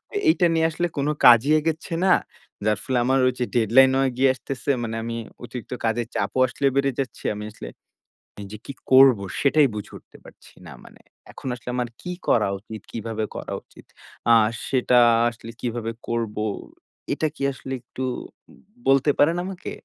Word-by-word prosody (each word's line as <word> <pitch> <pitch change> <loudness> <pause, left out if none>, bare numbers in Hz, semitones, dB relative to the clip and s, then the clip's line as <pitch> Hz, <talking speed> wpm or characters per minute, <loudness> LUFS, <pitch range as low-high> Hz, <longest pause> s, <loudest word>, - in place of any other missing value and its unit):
এ - - +1
এইটা 200 - +3
নিয়ে 160 0 +2
আসলে 175 +3 -1
কোন 140 +1 0 0.2
কাজই 120 +4 +7
এগচ্ছে 160 +2 -3
না। 185 - +4 0.5
যার 105 -1 +2
ফলে 130 - -1
আমার 130 +1 +3
হচ্ছে 125 0 -1
ডেডলাইন 120 +4 +5
হয়ে 135 -1 +2
গিয়ে 135 +1 +4
আসতেছে। 130 +3 -6
মানে 115 -1 -4
আমি 115 0 -4 0.3
অতিরিক্ত 120 0 -8
কাজের 115 +1 0
চাপও - - -1
আসলে 135 - -4
বেড়ে 140 0 +2
যাচ্ছে। 135 -2 -4
আমি 105 - -6
আসলে - - -9 0.8
যে 105 - -7
কি - - -5 0.2
করব 130 -3 +8 0.2
সেটাই 145 +1 +4
বুঝে 105 -1 -7
উঠতে - - -19
পারছি - - -16
না - - -10
মানে। - - -17 0.3
এখন - - -11
আসলে 125 0 -8
আমার 125 -1 -1
কি 180 - -5 0.2
করা 110 -4 +3
উচিত? 110 +1 -10
কিভাবে 110 -1 -3
করা - - -6
উচিত? - - -19 0.4
আ - - +8 0.4
সেটা 125 -1 +3 0.3
আসলে 115 -1 -11
কিভাবে 115 -2 -3 0.2
করব? 115 -2 -2 0.8
এটা 155 - 0
কি - - -7
আসলে 135 0 -8
একটু 125 +2 -9 0.9
বলতে 135 +2 +4
পারেন 165 +4 +4
আমাকে? 185 -1 -6
125 Hz, 170 wpm, -23 LUFS, 115-140 Hz, 0.9 s, করব